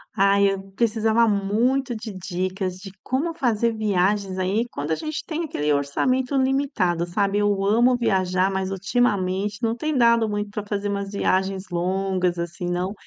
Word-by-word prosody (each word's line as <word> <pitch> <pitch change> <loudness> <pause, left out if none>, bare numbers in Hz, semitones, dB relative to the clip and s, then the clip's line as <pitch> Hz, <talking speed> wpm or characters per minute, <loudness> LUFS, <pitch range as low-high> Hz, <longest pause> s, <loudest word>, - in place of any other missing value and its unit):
Ai, 200 0 +4
eu 195 0 -6
precisava 225 +1 +2
muito 230 +6 +1
de 220 -1 -7
dicas, 185 0 -3
de 195 +1 -10
como 295 +6 -1
fazer 235 -7 +1
viagens 200 -2 0
aí, 195 +6 0
quando 145 -3 -4
a - - +3
gente 310 - -5
tem 330 +1 -3
aquele 150 - -1
orçamento 250 - 0
limitado, 260 - +1
sabe? 200 +3 0
Eu 205 -1 +1
amo 240 +5 +4
viajar, 190 -4 +1
mas 190 -1 -2
ultimamente 200 0 0
não 225 0 +1
tem 305 +4 -2
dado 235 -2 +4
muito 205 0 -3
pra 210 0 -4
fazer 205 0 -2
umas 200 0 -3
viagens 190 -1 0
longas, 185 0 0
assim, 170 +1 -4
não, 180 +2 -1
200 Hz, 160 wpm, -23 LUFS, 185-235 Hz, -, Ai